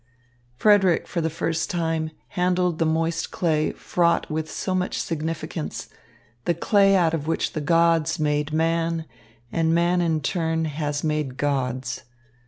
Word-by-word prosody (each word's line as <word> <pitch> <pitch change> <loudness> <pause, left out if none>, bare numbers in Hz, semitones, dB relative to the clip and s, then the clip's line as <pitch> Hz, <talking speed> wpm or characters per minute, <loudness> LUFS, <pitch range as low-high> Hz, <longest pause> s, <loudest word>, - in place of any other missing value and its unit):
Frederick 195 - +4
for 170 - -2
the 160 - 0
first 165 +1 -2
time 165 -2 -1 0.2
handled 180 -2 0
the 165 - +2
moist 165 +1 0
clay 155 -3 0
fraught 170 -1 +1
with 155 0 -2
so 185 - -3
much 185 0 -1
significance, 160 0 -4 0.6
the 170 - +1
clay 195 +3 +4
out 170 -3 +3
of 155 -2 -2
which 165 - -1
the 155 - -2
gods 165 0 +3
made 150 0 0
man 165 +1 0 0.5
and 165 0 +2
man 175 +1 +2
in 165 -2 +1
turn 160 +1 -1
has 150 -1 -2
made 150 -4 -1
gods. 130 -3 -1
165 Hz, 145 wpm, -24 LUFS, 155-170 Hz, 0.6 s, Frederick